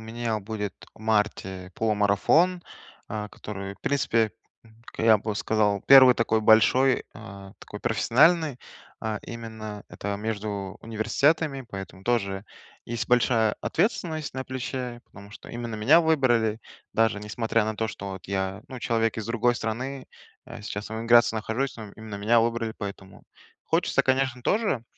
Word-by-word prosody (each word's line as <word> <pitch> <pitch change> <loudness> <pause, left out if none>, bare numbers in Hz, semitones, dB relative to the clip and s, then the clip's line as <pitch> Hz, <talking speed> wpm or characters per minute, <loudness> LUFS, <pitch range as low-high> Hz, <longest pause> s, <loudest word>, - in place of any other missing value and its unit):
меня 115 0 -3
будет 105 -1 -5 0.2
в - - -19
марте 105 -4 -1
полумарафон, 110 - +2 0.5
э, 105 -1 -4
который, 100 -1 -7
в - - -29
принципе, 115 -6 +1 0.6
к - - -9
я 110 -2 +6
бы 105 0 -4
сказал, 105 -1 +1
1 130 -2 +9
такой 110 -1 +1
большой, 125 +5 +4
э, 100 -3 -11
такой 105 - -10
профессиональный, 140 +5 +3 0.4
э, 110 -1 -2
именно 110 -3 -8
это 100 0 -4
между 105 -2 -4
университетами, 135 +5 0
поэтому 95 -2 -8
тоже 100 -5 -1 0.4
есть 115 -1 -3
большая 115 -3 +3
ответственность 160 - -1
на 130 - -4
плече, 130 -2 -5
потому 100 0 -14
что - - -12
именно 120 -1 -5
меня 130 +11 +5
выбрали. 120 -9 +2 0.3
Даже 115 -2 +2
несмотря 110 +1 0
на 110 0 -3
то, 110 +1 -1
что 100 -1 -6
вот 95 -2 -9
я, 95 +1 -3
ну, 130 - -7
человек 115 -1 0
из 110 - -4
другой 120 +1 +1
страны, 130 +4 -4 0.4
э, - - -10
сейчас 105 0 -5
в - - -9
эмиграции 115 0 +4
нахожусь, 110 +5 -2
но 110 -3 -9
именно 110 -1 -8
меня 115 +3 +3
выбрали, 115 -1 -1
поэтому 100 -1 -8 0.4
Хочется, - - +2
конечно, 130 -1 +1
тоже 200 - 0
110 Hz, 145 wpm, -26 LUFS, 105-125 Hz, 0.6 s, 1